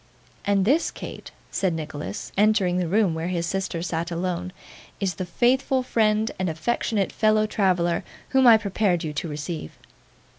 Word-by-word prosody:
'And 200 -1 +2
this, 290 +9 +3
Kate,' - - -8 0.2
said 185 -4 0
Nicholas, 150 -9 -6
entering 200 -3 +3
the 180 -2 0
room 195 -1 +2
where 160 +1 -3
his 175 -2 -1
sister 185 -2 -2
sat 170 -1 -2
alone, 180 +1 -3 0.5
'is 195 -3 0
the 180 +3 -5
faithful 255 +6 +2
friend 220 -2 +1
and 185 -2 0
affectionate 200 +4 -1
fellow 215 0 +3
traveller 180 -5 +1 0.3
whom 265 -1 +4
I 230 -2 +9
prepared 200 -4 0
you 155 -2 -3
to 150 +3 -3
receive. 150 - -5
185 Hz, 155 wpm, -24 LUFS, 170-215 Hz, 0.5 s, I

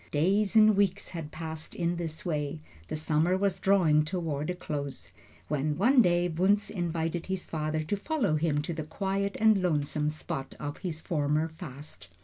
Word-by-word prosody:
Days 195 +8 +2
and 215 -1 +7
weeks 200 0 +1
had 160 -4 -6
passed 160 0 -7
in 175 0 0
this 165 -2 -5
way; 150 - -1 0.3
the - - -3
summer 155 +4 +1
was 195 -1 0
drawing 170 -6 +4
toward 155 -2 -2
a 180 - -1
close, 145 -5 -5 0.4
when 150 0 -1
one 245 +7 +5
day 175 -3 +3
Wunzh 190 +5 +1
invited 170 -2 -2
his 190 -1 -3
father 155 0 -2
to 180 +7 -2
follow 220 - 0
him 150 -2 +1
to 170 - -3
the 160 - -4
quiet 195 +5 -2
and 215 -2 +5
lonesome 150 -3 0
spot 135 -3 -5
of 145 0 -5
his 165 -4 -4
former 155 0 0
fast. 150 - -10
165 Hz, 170 wpm, -29 LUFS, 150-190 Hz, 0.4 s, and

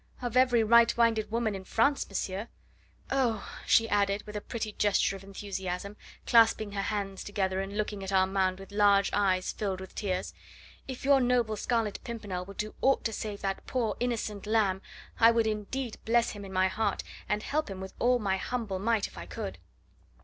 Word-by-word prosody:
"Of 245 -2 -4
every 250 -3 +5
right 235 +1 +6
minded 230 -2 +2
woman 225 -1 0
in 190 -1 -6
France, 230 +9 +1
monsieur. 195 +2 -3 0.6
Oh!" 245 -6 +1 0.2
she 225 - +5
added 200 -1 +1
with 210 0 -9
a 210 - -3
pretty 220 -1 -4
gesture 205 -1 +2
of 195 - -10
enthusiasm, 195 0 -5 0.3
clasping 225 -2 +4
her 200 -1 -2
hands 195 -1 -3
together, 190 -2 -1
and 195 +1 -5
looking 210 -2 -2
at 195 - -4
Armand 190 -1 +2
with 195 +1 -11
large 200 -1 +4
eyes 190 -2 +2
filled 195 -3 -3
with 190 0 -9
tears, 185 -3 -2 0.5
"if 260 0 -6
your 275 -1 +5
noble 245 -3 +2
Scarlet 220 -1 -1
Pimpernel 205 -6 -5
will 200 +1 -10
do 215 +2 -4
aught 270 0 +3
to 225 - -1
save 210 -1 -5
that 195 -1 -3
poor 235 -5 0
innocent 220 -4 -2
lamb, 205 -4 +2 0.4
I 230 - +8
would 230 -1 +3
indeed 220 +3 -3
bless 235 +1 +2
him 205 -1 -8
in 195 - -8
my 185 0 +3
heart, 220 +4 -1 0.3
and 210 +1 0
help 305 -4 -1
him 190 -1 -6
with 190 0 -7
all 250 +1 +4
my 195 -4 0
humble 215 -3 -3
might 220 +1 +1
if - - -9
I 85 - -8
could." 90 0 -6
210 Hz, 190 wpm, -29 LUFS, 195-230 Hz, 0.6 s, I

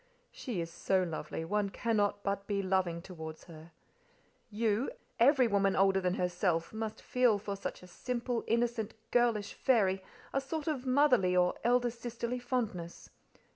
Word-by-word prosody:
"She 235 -9 -5
is 165 0 -4
so 190 +2 +1
lovely, 165 -1 -4
one 205 +3 0
cannot 205 -1 0
but 200 0 -2
be 200 -1 0
loving 185 -3 0
towards 160 -4 -8
her. 165 -1 -13 0.8
You—every 235 +4 +2
woman 200 -2 +2
older 195 0 +4
than 180 0 0
herself, 180 -2 0
must 220 0 -5
feel 250 -4 +3
for 200 0 -4
such 195 - -6
a - - -11
simple, 240 +5 -3
innocent, 235 -2 0 0.2
girlish 230 -4 +2
fairy 195 -7 +2 0.3
a 275 - +1
sort 295 +2 -4
of 270 -5 -2
motherly 250 -9 +4
or 180 0 +4
elder 245 0 +3
sisterly 235 +1 -4
fondness. 225 -9 -3
205 Hz, 145 wpm, -32 LUFS, 185-240 Hz, 0.8 s, older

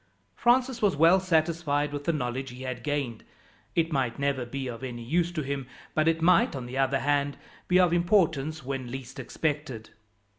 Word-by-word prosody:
Francis 250 +1 +2
was 205 -3 +3
well 165 +5 +6
satisfied 160 -4 +1
with 145 0 -5
the 170 - +2
knowledge 130 -2 -3
he 125 +1 -9
had 130 -2 -4
gained. 135 -5 -2 0.5
It 165 -1 +1
might 130 -4 0
never 140 -3 -1
be 135 +2 -4
of 120 +1 -7
any 120 -2 -5
use 170 +7 +1
to 155 -3 -2
him, 135 -1 -4 0.3
but 155 0 +2
it 165 0 +2
might, 185 - +4
on 130 -2 -5
the 130 +2 -4
other 135 0 +2
hand, 145 0 +1 0.3
be 180 0 +4
of 180 -2 +4
importance 160 -5 +1
when 135 -2 -4
least 130 0 -7
expected. 145 -7 -3
145 Hz, 185 wpm, -27 LUFS, 130-165 Hz, 0.5 s, well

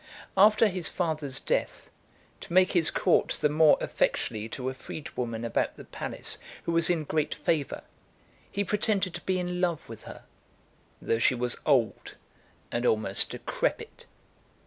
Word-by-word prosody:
After 215 +3 +6
his 185 -4 -2
father's 155 -6 -1
death, - - -2 0.5
to - - -9
make 185 +1 +5
his 170 -3 +4
court 180 - +2
the 150 - +3
more 155 0 +5
effectually 110 -1 -1
to 125 +3 -5
a 130 - -1
freedwoman 120 -4 -5
about 115 - -1
the - - -9
palace, - - -4 0.2
who - - -2
was 165 0 +2
in 170 -3 +1
great 155 0 -1
favour, 150 -2 -1 0.7
he 200 - 0
pretended 200 -2 0
to 175 - -6
be 185 -1 0
in 180 0 -2
love 170 -4 0
with 115 -1 -10
her, - - -10 0.8
though 115 - +1
she 125 - +3
was 125 0 -2
old, 130 -7 +1 0.6
and 120 - -1
almost 110 -4 +2
decrepit. - - -3
155 Hz, 150 wpm, -28 LUFS, 125-180 Hz, 0.8 s, After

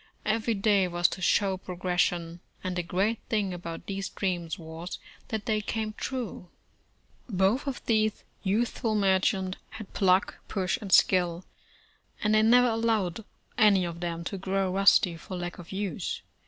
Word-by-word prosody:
Every 225 +1 +1
day 200 -2 +3
was 175 0 +3
to 185 - -6
show 190 +1 +2
progression, 180 -2 -1 0.2
and 185 -1 -2
the 180 - 0
great 195 +6 0
thing 205 -4 0
about 170 -2 -7
these 195 -1 -3
dreams 175 -2 -2
was, 165 +1 -7 0.3
that 220 -2 -4
they 215 -3 +1
came 215 0 -3
true. 230 -7 -5 0.8
Both 200 +7 +1
of 275 - -4
these 215 -2 +1 0.2
youthful 220 +2 0
merchants 190 -1 +1
had 220 -3 -10
pluck, 190 0 +2
push 190 -2 -1
and 200 -3 -6
skill, 175 -2 +4 0.8
and 210 0 +3
they 215 - +5
never 245 +3 +6
allowed 225 -4 0 0.4
any 200 -4 +5
of 170 -1 -5
them 170 -1 -3
to 195 +3 -4
grow 195 0 0
rusty 190 -2 +4
for 180 +2 -7
lack 175 0 -5
of 170 - -11
use. 195 -3 -3
195 Hz, 155 wpm, -28 LUFS, 180-215 Hz, 0.8 s, never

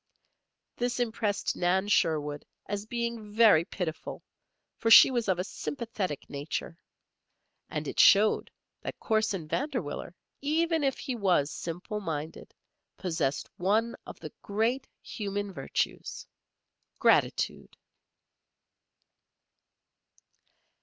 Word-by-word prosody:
This 245 0 -1
impressed 220 -3 -1
Nan 185 +3 +1
Sherwood 150 -7 +1 0.2
as 205 +1 -4
being 235 -2 -3
very 210 -7 +6
pitiful, 170 -2 -5 0.6
for 225 - +1
she 230 - +10
was 240 -3 -1
of 190 -2 +2
a 180 - -1
sympathetic 210 - -4
nature. 145 +3 -4 0.9
And - - -4
it - - -4
showed 210 +2 +6 0.3
that - - -6
Corson 215 -7 0
Vanderwiller, 240 - -3 0.3
even 320 +2 +1
if 270 -1 +1
he 260 -3 -4
was 180 -9 +2
simple 175 +5 -5
minded, 160 -5 -5 0.5
possessed 160 -6 -1
one 215 +6 +1
of - - -9
the - - -8
great 225 +6 0 0.2
human 205 -1 -4
virtues, 135 -5 -3 0.7
gratitude. - - +1
205 Hz, 100 wpm, -29 LUFS, 170-235 Hz, 0.9 s, she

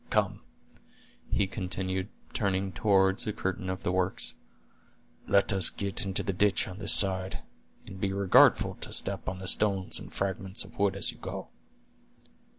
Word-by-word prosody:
Come," - - 0 0.9
he 100 - +1
continued, 95 0 -4 0.2
turning 95 -2 -1
toward 95 +2 +2
a - - 0
curtain 95 -2 -4
of 95 0 -5
the - - -1
works; 95 0 -1 0.9
"let 100 +1 +3
us 95 -2 +4
get 100 -1 -1
into 95 - 0
the 95 - -2
ditch 100 +2 +1
on 95 +2 -9
this 105 - +7
side, 95 -1 +3 0.4
and 95 0 -11
be 95 - -1
regardful 100 -1 +3
to - - -4
step 100 -1 0
on 90 - -6
the 95 0 -8
stones 95 0 +2
and - - -11
fragments 95 0 -2
of 100 +4 -16
wood 100 -1 +1
as 100 - 0
you - - -18
go." - - -7
95 Hz, 160 wpm, -28 LUFS, 95-100 Hz, 0.9 s, this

